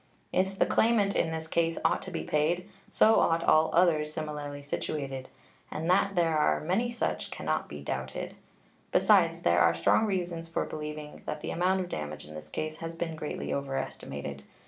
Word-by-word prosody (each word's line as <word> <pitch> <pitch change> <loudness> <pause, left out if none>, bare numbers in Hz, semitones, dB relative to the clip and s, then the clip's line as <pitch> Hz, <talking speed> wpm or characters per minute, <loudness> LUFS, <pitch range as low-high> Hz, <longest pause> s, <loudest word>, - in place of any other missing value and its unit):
If 190 +1 +1
the - - +4
claimant 220 -3 +3
in - - +2
this 160 0 -3
case 165 0 +1
ought - - +3
to - - -6
be 80 - -4
paid, 160 - 0 0.2
so 220 +1 +5
ought 165 0 +2
all 155 +1 +5
others 160 -4 +3
similarly 150 -2 -5
situated; 140 -2 -4 0.4
and 160 +2 -4
that 195 +1 +3
there 165 -2 +2
are - - +3
many 190 +9 0
such 235 -1 -2
can - - -7
not 80 0 0
be 75 - -7
doubted. 65 -1 -4 0.6
Besides, - - +4
there 85 0 +4
are 85 0 +5
strong 85 - +3
reasons 175 -4 -2
for 165 - -1
believing 150 -1 -6
that 150 0 -3
the - - -4
amount 185 +2 +2
of 180 - -5
damage 75 - -5
in 75 - -11
this 75 0 -9
case 155 - -4
has 165 0 -6
been 165 -1 -3
greatly 155 -1 -4
overestimated. 135 -1 -4
155 Hz, 185 wpm, -29 LUFS, 140-175 Hz, 0.6 s, so